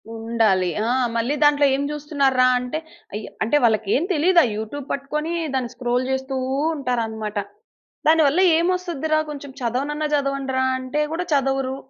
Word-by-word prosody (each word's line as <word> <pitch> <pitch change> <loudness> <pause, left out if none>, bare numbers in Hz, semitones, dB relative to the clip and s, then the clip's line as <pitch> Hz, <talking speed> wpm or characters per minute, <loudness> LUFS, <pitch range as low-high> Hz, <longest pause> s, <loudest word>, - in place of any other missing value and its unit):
ఉండాలి. 225 -5 +1 0.2
ఆ! - - +1 0.2
మళ్ళి 235 +5 0
దాంట్ల 290 -1 +5
ఎం 275 - -2
జూస్తున్నార్రా? 280 -3 +1
అంటే 250 +5 -4 0.3
అయి 210 +1 -4 0.2
అంటే 230 +7 +2
వాళ్ళకేం 220 +4 +2
తెలీదు. 345 +3 +4
ఆ - - +3
యూట్యూబ్ 240 +6 -5
పట్టుకొని 300 +4 -3 0.2
దాన్ని 255 -3 -1
స్క్రోల్ 245 +1 -1
జేస్తూ 265 0 -2 0.4
ఉంటారన్నమాట. 225 -6 -3 0.7
దానివల్ల 315 0 +4 0.2
ఏం 340 +1 +1
ఒస్తదిరా? 315 -4 -1
కొంచెం 285 -2 -7
చదవనన్న 280 +6 -2
చదవండిరా! 275 -2 -1
అంటే 260 +4 -2
గూడా 345 +2 -2
చదవరు. 270 -1 0
270 Hz, 135 wpm, -22 LUFS, 240-295 Hz, 0.7 s, దాంట్ల